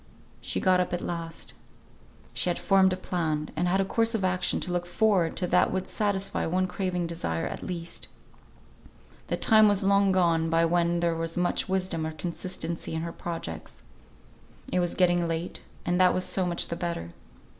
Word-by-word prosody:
She - - -1
got 185 -1 +3
up 180 -1 -1
at 175 - -1
last. 165 -1 -6 0.8
She - - +1
had 175 - 0
formed 190 -1 +4
a 185 - -1
plan, 160 -5 -2
and 175 +3 0
had 190 +2 +2
a 195 - +2
course 230 +3 +1
of 205 - -1
action 185 0 +1
to 180 - -3
look 175 0 -1
forward 185 -3 +2
to 185 - +1
that 180 0 +3
would 190 0 -2
satisfy 200 -4 -1
one 185 +3 +1
craving 180 -1 -2
desire 85 - -2
at - - -5
least. 170 -2 -6 1.2
The - - -1
time 215 -1 +5
was 205 -1 +3
long 200 0 +4
gone 170 -3 +2
by 165 +1 +3
when 170 0 +1
there 170 -1 +2
was 165 0 -3
much 180 +1 0
wisdom 185 -4 0
or 160 - -5
consistency 170 0 -3
in 160 - -2
her 170 0 -5
projects. 85 - -6 0.9
It 180 - +3
was 175 -1 0
getting 175 -2 +3
late, 165 +1 -3 0.2
and 175 +1 +2
that 180 -1 +5
was 185 - +1
so 185 -2 +1
much 175 -1 -1
the 170 - -2
better. 170 - -4
175 Hz, 190 wpm, -27 LUFS, 165-185 Hz, 1.2 s, time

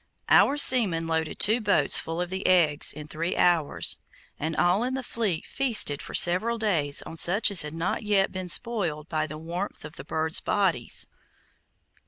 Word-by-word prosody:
Our 285 - +4
seamen 215 - +3
loaded 160 -1 -3
two 220 +4 +4
boats 205 -2 +1
full 165 +2 -5
of 180 0 -5
the 190 +1 -4
eggs 165 -5 +3
in 150 0 -10
three 165 +3 -4
hours, 170 -4 +1 0.4
and 160 +2 -4
all 180 +8 +1
in 255 +1 -3
the 265 - -5
fleet 215 -9 -3
feasted 225 - 0
for - - -8
several 210 +7 +3
days 165 -10 0
on 165 - -9
such 200 +6 +4
as 190 - +4
had 150 +1 -6
not 165 +2 -3
yet 205 -2 0
been 185 -1 -7
spoiled 175 -10 0
by 155 -1 -2
the 155 0 -9
warmth 170 +3 -7
of 150 +2 -12
the - - -9
birds' 160 +3 +1
bodies. 180 - 0
175 Hz, 180 wpm, -25 LUFS, 160-210 Hz, 0.4 s, Our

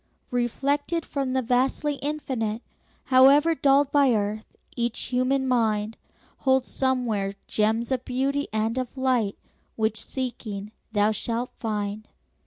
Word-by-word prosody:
Reflected 280 +7 0
from 270 -2 -2
the 260 0 +1
vastly 265 +4 +1
Infinite, 255 -7 -3 0.4
However 275 +5 +6
dulled 280 -2 +3
by 275 -5 +4
earth, 210 +1 -3 0.2
each 235 -1 -1
human 260 +2 0
mind 220 -3 +1 0.4
Holds 265 -1 +2
somewhere 240 -7 0
gems 220 +3 0
of 255 -1 0
beauty 275 +3 -1
and 220 +3 0
of 255 +1 -5
light 250 -6 +1 0.4
Which, 220 -1 -1
seeking, 215 -6 -5 0.2
thou 210 0 +3
shalt 235 +3 -2
find. 210 -1 -3
250 Hz, 120 wpm, -25 LUFS, 220-270 Hz, 0.4 s, However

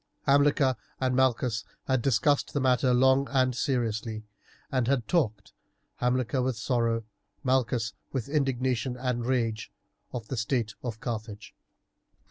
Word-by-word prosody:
Hamilcar 140 -2 +3 0.2
and 130 -1 +1
Malchus 125 -3 +2 0.2
had 130 -2 +1
discussed 135 +4 +2
the 145 - +1
matter 130 -1 +3
long 130 +2 +4
and 130 -2 +2
seriously, 115 -5 -1 0.5
and 130 -4 +1
had 125 -4 +1
talked, 110 - 0 0.4
Hamilcar 125 +1 +1
with 125 -2 -1
sorrow, 115 -1 0 0.4
Malchus 125 -4 +1 0.2
with 130 -5 -3
indignation 130 -3 0
and 125 -2 -2
rage, 115 -4 -1 0.4
of 115 -3 -5
the 130 - -4
state 115 -1 0
of 115 -3 -5
Carthage. 110 -3 -5
125 Hz, 125 wpm, -28 LUFS, 115-130 Hz, 0.5 s, long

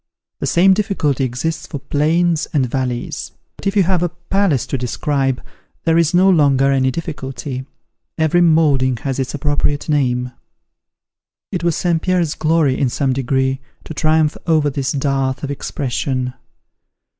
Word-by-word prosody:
The - - -2
same 190 +3 +5
difficulty 185 - 0
exists 130 +6 -3
for - - -5
plains 155 +4 +1
and 140 -4 +2
valleys. 125 -1 -3 0.2
But - - -6
if 195 - 0
you 200 - +5
have 180 -1 +1
a 175 - +1
palace 175 - 0
to - - -3
describe, 135 +2 -1 0.4
there 165 -1 +2
is 165 -2 +3
no 180 +2 +4
longer 140 -6 +4
any 130 -1 +2
difficulty. 135 -3 -5 0.5
Every 160 +2 +3
moulding 145 -7 +3
has 135 -1 -2
its 130 +2 -2
appropriate 145 0 0
name." 125 -4 +1 1.2
It 180 -3 -3
was 170 -2 +1
St. 170 -2 0
Pierre's 180 -4 +1
glory, 155 -4 +1
in 135 - +2
some 135 +1 0
degree, 130 +1 0 0.2
to - - -8
triumph 155 0 +2
over 155 -3 +3
this 135 -1 -2
dearth 135 -1 -1
of 140 - -2
expression. 130 -2 -2
145 Hz, 150 wpm, -18 LUFS, 130-165 Hz, 1.2 s, same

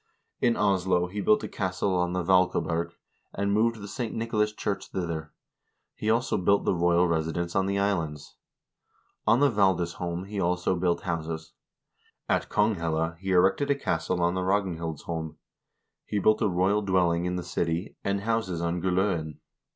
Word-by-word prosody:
In 115 - +2
Oslo 95 -3 +2
he 95 +3 -4
built 215 +1 +3
a - - -3
castle 95 0 -1
on 90 -1 0
the 90 -1 -1
Vaalkaberg, 85 -2 +2 0.4
and 100 0 0
moved 115 +2 +2
the 100 - -7
St. 120 +2 -4
Nicolas 110 -2 0
church 105 -1 -3
thither; 85 -4 -4 0.6
he 110 - -3
also 115 -1 +1
built 100 +2 +2
the - - +2
royal 85 0 +3
residence 85 +1 -1
in 95 -1 +1
the 100 0 0
islands. 80 -9 -2 0.9
On 115 +4 +5
the 145 -2 +5
Valdisholm 90 -3 0
he 100 0 -5
also 90 +1 +1
built 90 -1 0
houses. 80 -1 -4 0.7
At - - 0
Konghelle 85 -6 0
he 95 +1 -5
erected 95 +10 +3
a 140 - +4
castle 90 -8 -1
on 85 +1 +2
the 95 - -1
Ragnhildsholm; 85 -4 -2 0.7
he 105 - -2
built 110 +2 +3
a 110 - +3
royal 95 +4 +2
dwelling 90 -3 +2
in 90 0 -1
the 90 - -3
city, 85 +1 -2
and 100 0 0
houses 110 -5 -1
on 85 +1 -1
Gull0en. 90 -4 0
90 Hz, 160 wpm, -27 LUFS, 85-100 Hz, 0.9 s, On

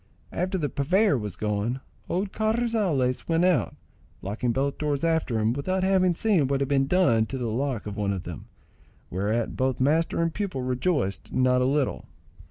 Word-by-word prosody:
After 185 +2 -1
the 150 -5 -1
purveyor 170 +7 +2
was 105 -7 -4
gone, 105 +5 -1 0.3
old 190 +2 -1
Carrizales 215 - 0
went 165 +2 +3
out, 155 - +2 0.5
locking 110 +5 -1
both 140 +3 -1
doors 145 -1 -1
after 160 -8 +1
him, 110 +1 +1
without 185 +8 -1
having 185 -2 +3
seen 185 -8 +2
what 140 0 0
had 140 - 0
been 135 -1 +2
done 125 -11 +3
to 135 - -4
the 125 - -3
lock 130 -1 -2
of 105 -1 -6
one 100 -1 0
of 95 -2 -3
them, 85 -3 -8 0.6
whereat 105 +5 -1
both 130 0 0
master 155 +6 +2
and 165 -1 +1
pupil 190 -11 -3
rejoiced 125 - -1
not 125 0 +3
a - - +2
little. 140 0 0
140 Hz, 180 wpm, -26 LUFS, 120-175 Hz, 0.6 s, went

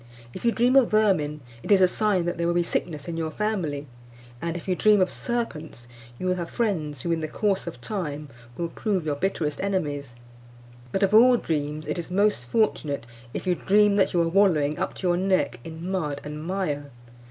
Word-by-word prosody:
If - - -8
you 235 - +4
dream 245 +3 +2
of 260 -4 +5
vermin, 180 -9 +2 0.2
it - - -9
is 200 - +7
a 185 - +6
sign 195 -2 +1
that 175 0 -2
there 170 - +1
will 170 - +1
be 175 - +3
sickness 155 -3 -3
in 165 -1 -4
your 160 -1 -1
family; 165 -7 -2 0.6
and 170 0 -2
if 170 - -10
you 185 - +1
dream 210 +2 +4
of 185 -1 +2
serpents, 160 - -4 0.3
you 185 - -5
will 185 0 +1
have 170 -1 -4
friends 155 - -2
who, 170 - -1
in 165 - +1
the 155 - -3
course 195 +2 -1
of 165 -7 -6
time, 150 - -4 0.3
will 170 -1 -2
prove 190 -3 -2
your 150 - 0
bitterest 150 -3 -2
enemies; 145 -10 -2 0.8
but, 195 - 0
of 195 +1 +2
all 245 +3 +7
dreams, 150 -4 -2
it 150 +4 -3
is 170 - -5
most 200 -7 +1
fortunate 145 - 0 0.3
if - - -4
you 180 - +3
dream 205 +3 +3
that 195 - +3
you 175 - +1
are - - 0
wallowing 165 -6 +3
up - - -2
to 185 - -3
your 175 0 +2
neck 185 -10 +1
in 160 +2 -7
mud 150 -7 -2
and 150 +1 -6
mire. 155 -6 -2
175 Hz, 210 wpm, -25 LUFS, 150-200 Hz, 0.8 s, is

